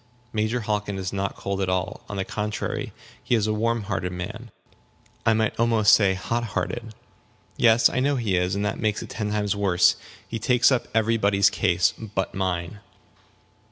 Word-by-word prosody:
"Major 110 +3 0
Hockin 105 -2 -2
is 95 0 -4
not 100 0 -2
cold 100 0 -3
at 95 - 0
all. 95 0 -2
On 105 - -5
the 95 - -1
contrary, 105 0 -3 0.3
he 120 - +1
is 110 -3 +1
a 110 - 0
warm 115 +1 0
hearted 95 -3 -3
man 110 +7 -6 0.8
I 115 - +6
might 110 0 0
almost 115 -3 +4
say 95 -3 +4
hot 115 +5 -2
hearted." 115 -1 -4 0.6
"Yes, 115 0 +5
I - - -2
know 140 +2 +2
he 110 -7 0
is. 90 +1 0
And 100 +1 -1
that 105 - -2
makes 110 -1 -1
it - - -10
ten 105 -2 -3
times 105 -1 0
worse. 95 -3 +3 0.3
He 115 - -4
takes 125 +4 +4
up 130 -2 +1
every 115 +1 +2
body's 100 -2 +3
case 90 -3 +2 0.2
but 95 - -1
mine." 95 0 -2
105 Hz, 185 wpm, -24 LUFS, 95-115 Hz, 0.8 s, I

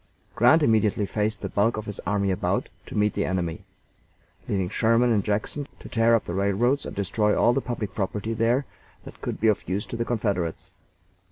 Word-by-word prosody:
Grant 150 +8 +5
immediately 110 -4 +2
faced 105 +1 -1
the - - -2
bulk 110 +3 +1
of 110 - -4
his 105 -1 -5
army 100 0 +1
about 95 - -1 0.2
to - - -6
meet 105 -1 +2
the - - 0
enemy, 90 -3 -2 0.9
leaving 95 -2 0
Sherman 115 +5 +2
in 105 - +2
Jackson 110 +8 -2
to - - -10
tear 115 0 +3
up 115 - 0
the 85 - -4
railroads 100 +8 +1
and - - -7
destroy 105 +2 +1
all 120 - +4
the 135 - 0
public 120 -6 -4
property 105 +2 -2
there 115 +5 +1 0.4
that - - -12
could - - -4
be 110 - +2
of 105 -5 +1
use 95 +3 -1
to - - -7
the 115 - 0
Confederates. 100 -8 -2
105 Hz, 195 wpm, -25 LUFS, 100-115 Hz, 0.9 s, Grant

